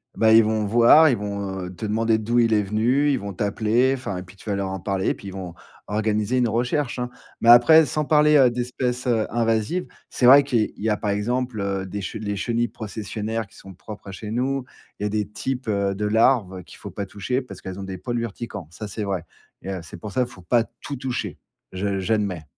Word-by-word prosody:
bah 110 Hz, -1 st, +4 dB
ils 110 Hz, 0 st, +8 dB
vont 110 Hz, 0 st, 0 dB
voir, 120 Hz, +9 st, +7 dB
ils 125 Hz, -, +1 dB
vont, 100 Hz, -2 st, -4 dB
heu, 90 Hz, 0 st, -8 dB
te 110 Hz, -, -5 dB
demander 110 Hz, +1 st, +1 dB
d'où 115 Hz, +3 st, -1 dB
il 115 Hz, -1 st, +3 dB
est 105 Hz, -, +4 dB
venu, 115 Hz, +8 st, +1 dB
ils 135 Hz, -, +1 dB
vont 100 Hz, 0 st, -6 dB
t'appeler, 110 Hz, +6 st, +1 dB
enfin 115 Hz, -8 st, -5 dB
et -, -, -4 dB
puis 95 Hz, +1 st, -16 dB
tu 100 Hz, -, -17 dB
vas 100 Hz, -, 0 dB
leur 100 Hz, -1 st, -2 dB
en 95 Hz, 0 st, -4 dB
parler 95 Hz, +1 st, -2 dB
et -, -, +3 dB
puis 100 Hz, -, -9 dB
ils -, -, -9 dB
vont 90 Hz, -3 st, -7 dB, 0.3 s
organiser 110 Hz, +3 st, 0 dB
une 125 Hz, -1 st, +3 dB
recherche, 125 Hz, +4 st, -1 dB
hein, 125 Hz, 0 st, -2 dB, 0.3 s
mais 115 Hz, -, +4 dB
après, 155 Hz, +7 st, +8 dB
sans 150 Hz, +4 st, -1 dB
parler, 150 Hz, 0 st, +4 dB
heu, 130 Hz, -3 st, +6 dB
d'espèces, 125 Hz, +1 st, -2 dB
heu, 115 Hz, -3 st, +2 dB
invasives, 115 Hz, +8 st, 0 dB, 0.2 s
c'est 125 Hz, -, +2 dB
vrai 140 Hz, +3 st, +9 dB
qu'il 120 Hz, -6 st, 0 dB
y 110 Hz, -, -3 dB
a 105 Hz, -, +1 dB
par 105 Hz, -, -3 dB
exemple, 120 Hz, +3 st, -1 dB
heu, 100 Hz, -1 st, -2 dB
des 100 Hz, +2 st, -5 dB
les 105 Hz, -2 st, -3 dB
chenilles 120 Hz, +3 st, 0 dB
processionnaires 110 Hz, 0 st, -5 dB
qui -, -, -22 dB
sont 95 Hz, -, -12 dB
propres 105 Hz, +2 st, -10 dB
à -, -, -6 dB
chez 105 Hz, +3 st, -7 dB
nous, 130 Hz, +3 st, -1 dB, 0.3 s
il -, -, -4 dB
y -, -, +1 dB
a -, -, -2 dB
des 105 Hz, -1 st, -1 dB
types, 130 Hz, +4 st, -4 dB
heu, 100 Hz, -2 st, 0 dB
de 105 Hz, +2 st, -2 dB
larves 105 Hz, -4 st, +2 dB
qu'il -, -, -15 dB
faut -, -, -9 dB
pas 100 Hz, -, -5 dB
toucher, 115 Hz, +7 st, -2 dB
parce 125 Hz, -, -11 dB
qu'elles 95 Hz, 0 st, -7 dB
ont -, -, -5 dB
des 95 Hz, -1 st, -6 dB
poils 120 Hz, +2 st, -3 dB
urticants, 110 Hz, -5 st, -6 dB
ça, 95 Hz, +6 st, -8 dB
c'est 105 Hz, +1 st, -5 dB
vrai, 95 Hz, -4 st, -2 dB, 0.4 s
et 95 Hz, -, -6 dB
heu, 95 Hz, -, -4 dB
c'est 80 Hz, -, -11 dB
pour 105 Hz, +4 st, -8 dB
ça 125 Hz, +4 st, 0 dB
faut 105 Hz, -6 st, -14 dB
pas 115 Hz, +6 st, +3 dB, 0.2 s
tout 145 Hz, -, -5 dB
toucher, 130 Hz, -1 st, -4 dB, 0.3 s
je 100 Hz, +1 st, -2 dB
j'admets. 100 Hz, -4 st, -1 dB
110 Hz, 240 wpm, -23 LUFS, 100-120 Hz, 0.4 s, vrai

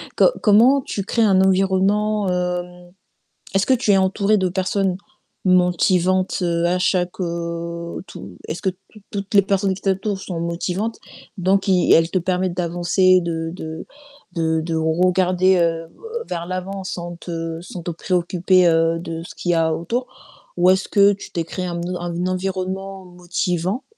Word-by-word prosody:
co -, -, +5 dB
comment 235 Hz, +7 st, +5 dB
tu 200 Hz, -5 st, -4 dB
crées 230 Hz, +4 st, +1 dB
un 190 Hz, -3 st, +4 dB
environnement, 195 Hz, +2 st, +2 dB
heu 180 Hz, 0 st, -1 dB, 0.9 s
est-ce 195 Hz, 0 st, +2 dB
que 260 Hz, -, +4 dB
tu 230 Hz, -3 st, 0 dB
es 195 Hz, -, +5 dB
entourée 195 Hz, +2 st, +2 dB
de 185 Hz, -, +1 dB
personnes 190 Hz, 0 st, 0 dB, 0.5 s
motivantes, 185 Hz, 0 st, +2 dB
heu, 170 Hz, -1 st, +1 dB
à 180 Hz, +1 st, +1 dB
chaque, 180 Hz, 0 st, 0 dB
heu 170 Hz, 0 st, -4 dB
tout 95 Hz, -3 st, -10 dB
est-ce 160 Hz, -, -5 dB
que 190 Hz, -, +1 dB, 0.2 s
tou 215 Hz, -, -16 dB
toutes 200 Hz, 0 st, -5 dB
les 200 Hz, -, +7 dB
personnes 195 Hz, 0 st, 0 dB
qui 195 Hz, -, -12 dB
t'entourent 195 Hz, +1 st, -1 dB
sont 180 Hz, -4 st, -5 dB
motivantes? 180 Hz, +6 st, -3 dB, 0.4 s
Donc 190 Hz, +2 st, +2 dB
ils 185 Hz, -2 st, +4 dB
elles 165 Hz, +1 st, +4 dB
te 185 Hz, -, +1 dB
permettent 180 Hz, 0 st, -1 dB
d'avancer, 175 Hz, +1 st, +3 dB
de 165 Hz, -1 st, -3 dB
de 160 Hz, -2 st, -7 dB, 0.5 s
de 160 Hz, -1 st, +1 dB
de 165 Hz, 0 st, -3 dB
regarder, 180 Hz, +3 st, +2 dB
heu, 165 Hz, -1 st, 0 dB, 0.4 s
vers 170 Hz, 0 st, -4 dB
l'avant 185 Hz, +2 st, -5 dB
sans 175 Hz, -1 st, -5 dB
te 165 Hz, -1 st, -5 dB
sans 175 Hz, 0 st, -8 dB
te 175 Hz, -, -4 dB
préoccuper, 180 Hz, +1 st, +2 dB
heu, 165 Hz, 0 st, +2 dB
de 165 Hz, -1 st, -6 dB
ce -, -, -11 dB
qu'il 175 Hz, -, -3 dB
y -, -, +3 dB
a 160 Hz, -1 st, +2 dB
autour. 230 Hz, +11 st, -3 dB, 0.5 s
Ou 175 Hz, +1 st, +5 dB
est-ce 190 Hz, +1 st, +1 dB
que 200 Hz, 0 st, +5 dB
tu 200 Hz, -, -8 dB
t'es 170 Hz, -, -2 dB
créée 180 Hz, +2 st, -5 dB
un 170 Hz, -1 st, -4 dB, 0.2 s
un 175 Hz, 0 st, -3 dB
environnement 190 Hz, +1 st, -3 dB
motivant, 180 Hz, +4 st, -2 dB
180 Hz, 165 wpm, -21 LUFS, 170-190 Hz, 0.9 s, les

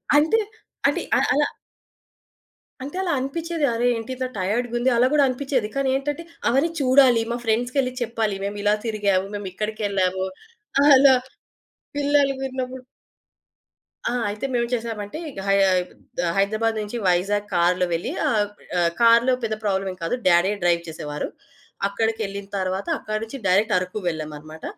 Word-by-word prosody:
అంటే 320 Hz, +10 st, +4 dB, 0.5 s
అంటే -, -, 0 dB, 0.2 s
అ -, -, +3 dB
అలా 290 Hz, +1 st, +3 dB, 1.4 s
అంటే 285 Hz, +5 st, -7 dB
అలా 365 Hz, -3 st, 0 dB
అనిపిచ్చేది, 320 Hz, +4 st, -2 dB
అరె! 235 Hz, +1 st, 0 dB
ఏంటి 225 Hz, +2 st, -6 dB
ఇంత 255 Hz, 0 st, -3 dB
టైయాడ్‌గుంది 240 Hz, +6 st, 0 dB
అలా 245 Hz, +2 st, +4 dB
గూడా 295 Hz, -1 st, +5 dB
అనిపిచ్చేది. 255 Hz, -3 st, -1 dB
కానీ 275 Hz, -1 st, +1 dB
ఏంటంటే 290 Hz, +4 st, -2 dB, 0.2 s
అవన్నీ 270 Hz, +7 st, +3 dB
చూడాలి 260 Hz, -3 st, +5 dB
మా 240 Hz, -, -1 dB
ఫ్రెండ్స్‌కెళ్లి 245 Hz, +3 st, 0 dB
చెప్పాలి. 225 Hz, -3 st, -1 dB
మేము 200 Hz, +1 st, -3 dB
ఇలా 205 Hz, 0 st, +4 dB
తిరిగాము, 200 Hz, -4 st, +1 dB
మేమిక్కడికెళ్ళాము 195 Hz, -1 st, -1 dB, 0.7 s
అలా 265 Hz, 0 st, +7 dB, 0.8 s
పిల్లలుగున్నప్పుడు 270 Hz, -3 st, 0 dB, 1.3 s
ఆ! -, -, -1 dB, 0.2 s
అయితే 210 Hz, +5 st, -4 dB
మేమేంచేసామంటే, 235 Hz, -2 st, -2 dB
ఇగ 260 Hz, -, -9 dB
హై 195 Hz, -, +4 dB, 0.8 s
హైదరాబాద్ 215 Hz, +3 st, +1 dB
నుంచి 210 Hz, +3 st, -5 dB
వైజాగ్ 200 Hz, +4 st, +1 dB
కార్‌లో 180 Hz, +1 st, +3 dB
వెళ్ళి 165 Hz, -, -2 dB, 0.2 s
ఆ! -, -, +3 dB, 0.5 s
అ -, -, +3 dB, 0.2 s
కార్‌లో 235 Hz, +2 st, +6 dB
పెద్ద 220 Hz, -1 st, -1 dB
ప్రాబ్లమేం 195 Hz, -2 st, -1 dB
కాదు. 165 Hz, -, 0 dB
డాడే 175 Hz, +2 st, +5 dB
డ్రైవ్ 170 Hz, -1 st, +3 dB
చేసేవారు. 150 Hz, -2 st, -5 dB, 0.6 s
అక్కడికెళ్ళిన 200 Hz, -1 st, -2 dB
తర్వాత 190 Hz, +1 st, -2 dB
అక్కడి 215 Hz, 0 st, -3 dB
నుంచి 225 Hz, +4 st, -7 dB
డైరెక్ట్ 205 Hz, +4 st, +3 dB
అరకు 180 Hz, +3 st, -5 dB
వెళ్ళామనమాట. 155 Hz, -1 st, -5 dB
225 Hz, 130 wpm, -23 LUFS, 195-260 Hz, 1.4 s, అలా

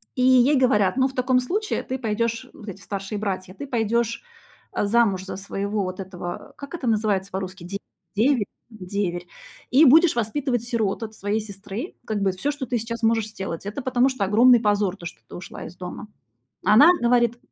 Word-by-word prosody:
И 255 Hz, -, -1 dB
ей 255 Hz, +3 st, +5 dB
говорят: 215 Hz, -6 st, +3 dB
"Ну, 260 Hz, 0 st, +4 dB
в 265 Hz, -, -9 dB
таком 255 Hz, 0 st, +2 dB
случае 410 Hz, +12 st, -2 dB
ты 260 Hz, 0 st, -4 dB
пойдёшь- 230 Hz, 0 st, -1 dB
вот 215 Hz, -2 st, -10 dB
эти 195 Hz, -, -8 dB
старшие 200 Hz, +1 st, -5 dB
братья- 185 Hz, -3 st, -3 dB
ты 280 Hz, +6 st, -8 dB
пойдёшь, 230 Hz, -1 st, 0 dB, 0.5 s
а, -, -, -1 dB
замуж 200 Hz, -4 st, +2 dB
за 190 Hz, -, -5 dB
своего 200 Hz, +1 st, -3 dB
вот 185 Hz, +1 st, -5 dB
этого 185 Hz, +7 st, -7 dB
как 280 Hz, +3 st, -9 dB
это 290 Hz, -8 st, -4 dB
называется 210 Hz, -3 st, +1 dB
по-русски? 190 Hz, -1 st, -5 dB
Де 200 Hz, +2 st, -4 dB, 0.4 s
деверь 235 Hz, -1 st, +3 dB, 0.2 s
деверь 185 Hz, -4 st, -4 dB, 0.4 s
и 290 Hz, +5 st, +7 dB
будешь 315 Hz, +2 st, +6 dB
воспитывать 245 Hz, +1 st, -1 dB
сирот 230 Hz, -3 st, -1 dB
от 220 Hz, 0 st, -6 dB
своей 205 Hz, +1 st, -1 dB
сестры, 205 Hz, -, -7 dB
как 215 Hz, -2 st, -2 dB
бы 195 Hz, -1 st, +2 dB
всё, 185 Hz, +11 st, -3 dB
что 285 Hz, -2 st, -5 dB
ты 240 Hz, +1 st, -1 dB
сейчас 230 Hz, +1 st, -5 dB
можешь 225 Hz, -1 st, +2 dB
сделать. 190 Hz, -4 st, -6 dB
Это 210 Hz, +7 st, -4 dB
потому 255 Hz, +1 st, +2 dB
что 260 Hz, -6 st, -2 dB
огромный 235 Hz, +5 st, +6 dB
позор, 205 Hz, -3 st, +1 dB
то, 170 Hz, -, -11 dB
что 175 Hz, -, -8 dB
ты -, -, -10 dB
ушла 175 Hz, -, -8 dB
из 170 Hz, -, -10 dB
дома". 180 Hz, +3 st, -7 dB, 0.6 s
А -, -, +5 dB
она 290 Hz, +9 st, +8 dB
говорит 240 Hz, 0 st, +3 dB
220 Hz, 195 wpm, -24 LUFS, 195-250 Hz, 0.6 s, она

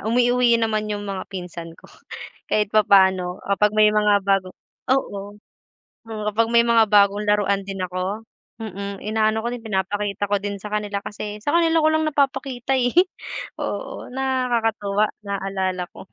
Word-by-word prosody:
umuuwi 245 Hz, 0 st, +3 dB
naman 215 Hz, -2 st, -1 dB
yung 205 Hz, -1 st, -3 dB
mga 195 Hz, -2 st, -5 dB
pinsan 175 Hz, -3 st, -8 dB
ko. -, -, -22 dB, 0.6 s
Kahit 210 Hz, -1 st, 0 dB
papaano 190 Hz, -3 st, +4 dB
ah 200 Hz, -, -1 dB
kapag 210 Hz, 0 st, +2 dB
may 215 Hz, 0 st, +5 dB
mga 210 Hz, -2 st, +3 dB
bagong, 195 Hz, -2 st, 0 dB, 0.3 s
oo, 205 Hz, -6 st, -1 dB, 0.7 s
oo 220 Hz, -1 st, -6 dB
kapag 225 Hz, +2 st, +1 dB
may 235 Hz, -, +7 dB
mga 235 Hz, -1 st, +4 dB
bagong 205 Hz, 0 st, +4 dB
laruan 200 Hz, -1 st, +1 dB
din 195 Hz, -1 st, -5 dB
ako, 185 Hz, +4 st, -3 dB, 0.4 s
mm, 200 Hz, -2 st, -6 dB
inaano 220 Hz, +1 st, +1 dB
ko 235 Hz, -, -2 dB
din 240 Hz, -1 st, -7 dB
pinapakita 205 Hz, 0 st, -2 dB
ko 205 Hz, -, +2 dB
din 200 Hz, 0 st, -5 dB
sa 210 Hz, -, -7 dB
kanila 205 Hz, -1 st, -2 dB
kasi 210 Hz, 0 st, -7 dB
sa 290 Hz, +8 st, +1 dB
kanila 330 Hz, -1 st, +3 dB
ko 310 Hz, -, +4 dB
lang 315 Hz, 0 st, +1 dB
napapakita, 270 Hz, -3 st, 0 dB
eh, 245 Hz, -1 st, +1 dB, 0.6 s
oo -, -, -5 dB
nakakatuwa 230 Hz, -6 st, 0 dB, 0.2 s
naalala 190 Hz, -2 st, -2 dB
ko, -, -, -13 dB
210 Hz, 155 wpm, -22 LUFS, 200-230 Hz, 0.7 s, may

